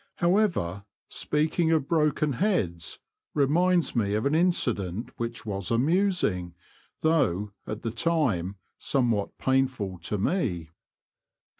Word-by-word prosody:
However, 170 - +1 0.2
speaking 155 +2 0
of 155 -4 +2
broken 150 -2 +2
heads 100 - -1 0.4
reminds 170 +5 +2
me 105 -3 +1
of 110 - -1
an 140 - +2
incident 120 - 0
which 115 -1 -4
was 100 -3 -3
amusing, 125 - +1 0.5
though, 125 - +2 0.2
at 110 0 -5
the 115 - -2
time, 115 - 0 0.2
somewhat 120 -7 0
pain 135 0 +3
ful 100 -8 -6
to 90 +5 -3
me. 95 - -1
125 Hz, 115 wpm, -27 LUFS, 100-160 Hz, 0.5 s, pain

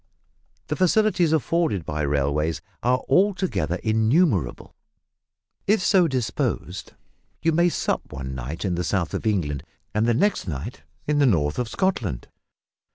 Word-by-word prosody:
The - - -2
facilities 185 -2 +3
afforded 160 - +1
by 75 0 -3
railways 75 +2 0 0.2
are 125 +1 +1
altogether 180 - +1
innumerable. 110 - +1 0.9
If 210 +3 +4
so 185 -3 +4
disposed 130 -5 -2 0.5
you 165 - +3
may 170 +2 +3
sup - - -2
one 65 0 -5
night 65 - -5
in 95 - 0
the 90 +1 -1
south 90 -1 -1
of - - -2
England 75 -10 -1 0.3
and 105 +2 +1
the 120 - +3
next 205 - +1
night 70 -2 -5 0.2
in 150 0 +1
the 140 - +5
north 75 -7 +1
of 120 -2 -2
Scotland. 110 - -1
110 Hz, 140 wpm, -24 LUFS, -, 0.9 s, the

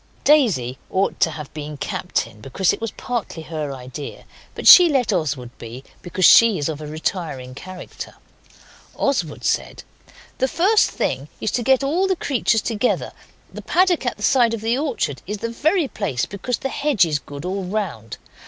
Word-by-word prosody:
Daisy 190 - +3
ought 190 +1 0
to - - +3
have 150 -3 -8
been 150 -1 -7
captain 105 -5 -3
because 170 - 0
it - - -6
was 225 - -2
partly 230 -10 -5
her 155 -3 -4
idea, 130 +2 -8 0.3
but - - -3
she 355 -2 +10
let 255 -7 +1
Oswald 140 -8 -2
be, 120 +3 -9 0.2
because 180 +1 0
she 230 -4 +7
is 145 - -2
of 155 -2 -4
a 150 - -7
retiring 150 -4 -4
character. 185 +6 -9 0.8
Oswald 180 - -1
said - - -1 0.6
'The 260 - +2
first 395 +10 +3
thing - - -3
is - - -2
to 245 - -1
get 265 +3 +3
all 340 +8 +1
the 380 - +1
creatures 240 - 0
together; 230 +1 -1 0.4
the - - -7
paddock 360 -3 +2
at - - -2
the 210 - -9
side 240 -2 +3
of 220 - -8
the 225 +2 +1
orchard 250 - -2
is 210 +2 -3
the 230 - -4
very 315 +6 +1
place, 185 - -2
because 205 +5 -3
the 270 - -4
hedge 280 -9 +2
is 150 -3 -1
good 145 +3 -9
all 190 +1 -3
round. 180 - -4
195 Hz, 180 wpm, -21 LUFS, -, 0.8 s, she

